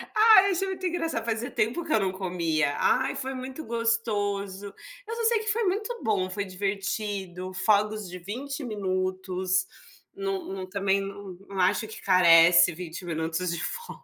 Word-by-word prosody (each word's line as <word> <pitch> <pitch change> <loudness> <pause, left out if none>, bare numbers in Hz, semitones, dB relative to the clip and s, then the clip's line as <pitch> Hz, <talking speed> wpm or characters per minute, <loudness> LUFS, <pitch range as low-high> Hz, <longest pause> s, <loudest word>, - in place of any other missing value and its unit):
Ai, 430 -3 +7
achei 385 +1 0
muito 375 -1 -4
engraçado, 330 -9 -2
fazia 230 +1 -2
tempo 240 +11 -1
que 320 - -7
eu 220 - +4
não 190 -2 0
comia. 170 -6 -1
Ai, 260 +1 +2
foi 265 0 -3
muito 260 +4 -7
gostoso. 205 -4 -1 0.4
Eu 455 - -4
só 465 - -3
sei 455 -1 +4
que 435 - -7
foi 455 +2 0
muito 425 +5 -2
bom, 195 -4 0
foi 200 +2 -3
divertido, 195 -1 -3
fogos 210 +2 +1
de 180 +1 -8
20 270 - -5
minutos. 185 -3 -1 0.5
Não 390 -2 -3
não 190 -1 -6
também 200 0 +1
n 195 -2 -8
não 195 -1 -5
acho 200 +5 +2
que 220 - -9
carece 170 -1 +6
20 170 +1 -7
minutos 165 +1 -2
de 170 -2 -3
fogos. 470 0 -5
200 Hz, 165 wpm, -27 LUFS, 185-265 Hz, 0.5 s, Ai